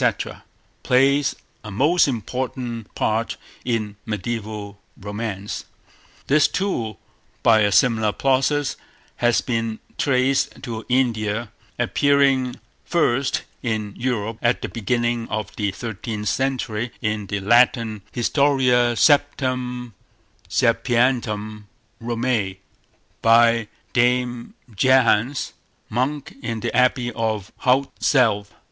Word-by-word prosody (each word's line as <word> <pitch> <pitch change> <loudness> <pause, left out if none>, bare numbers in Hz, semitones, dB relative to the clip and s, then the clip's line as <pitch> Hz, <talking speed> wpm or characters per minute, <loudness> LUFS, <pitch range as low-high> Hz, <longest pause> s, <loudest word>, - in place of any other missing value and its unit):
—plays 135 +2 +3 0.3
a 105 - -7
most 145 - +3
important 120 -1 -4
part 110 +1 -1 0.3
in 110 -4 -2
mediaeval 105 -1 -5 0.2
romance. 105 0 -5 0.6
This, 145 +1 +4
too, 120 - -2 0.5
by 110 -1 +6
a 105 -1 +3
similar 110 -2 +3
process, 135 +3 +1 0.4
has 120 -1 +3
been 115 -2 -2 0.2
traced 130 0 +1
to 115 -2 -6
India, 115 -3 0 0.3
appearing 135 0 +2 0.3
first 140 -5 +1 0.2
in 110 -4 -2
Europe 115 -3 -2
at 120 +1 +1
the - - -3
beginning 120 +1 -1
of 110 -1 -4
the 105 -2 0
thirteenth 105 0 -4
century 125 -4 -1
in 105 -2 -1
the 100 +1 -2
Latin 115 0 +3
Historia 125 -2 +2
Septem 125 -4 +1 0.6
Sapientum 115 -3 +1 0.3
Romae, 115 -5 -1 0.6
by 115 -1 +5 0.3
Dame 125 0 +1 0.2
Jehans, 130 +2 +3 0.4
monk 130 +5 -2
in 115 -1 -3
the 120 - -2
Abbey 125 -1 +2
of 110 -4 -2
Haute 130 +2 +2
Selve. 105 -7 +2
120 Hz, 100 wpm, -22 LUFS, 110-130 Hz, 0.6 s, by